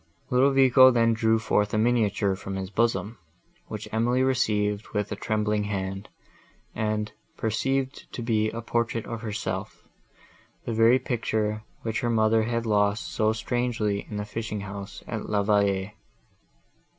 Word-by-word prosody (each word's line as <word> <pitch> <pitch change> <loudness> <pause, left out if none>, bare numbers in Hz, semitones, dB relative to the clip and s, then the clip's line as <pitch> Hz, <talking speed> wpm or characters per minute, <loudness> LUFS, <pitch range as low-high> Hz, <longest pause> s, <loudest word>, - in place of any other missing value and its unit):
Ludovico 130 0 +6
then 115 -2 +3
drew 110 0 +2
forth 105 -2 +1
a - - +2
miniature 110 -4 +2
from 95 0 -6
his 95 0 -5
bosom, 115 0 0 0.5
which - - -6
Emily 120 +3 +2
received 105 -5 +1
with 105 0 -1
a - - -1
trembling 105 -1 -1
hand, 95 -1 -4 0.6
and 105 -1 -1 0.3
perceived 130 +5 -1
to 120 - -5
be 110 -2 +1
a 115 +1 -6
portrait 115 -1 -1
of 115 -1 -5
herself—the 115 +1 -7
very 115 +3 +5
picture, 110 -4 -1 0.2
which 115 0 -1
her 120 - -1
mother 110 -1 +3
had 115 +1 -1
lost 105 0 +1
so 110 -1 +2
strangely 115 -2 -1
in 105 - -5
the 105 - -3
fishing 105 0 -4
house 100 0 -8
at - - -5
La 105 -1 +1
Vallée. 100 -1 +1
110 Hz, 140 wpm, -26 LUFS, 105-115 Hz, 0.6 s, Ludovico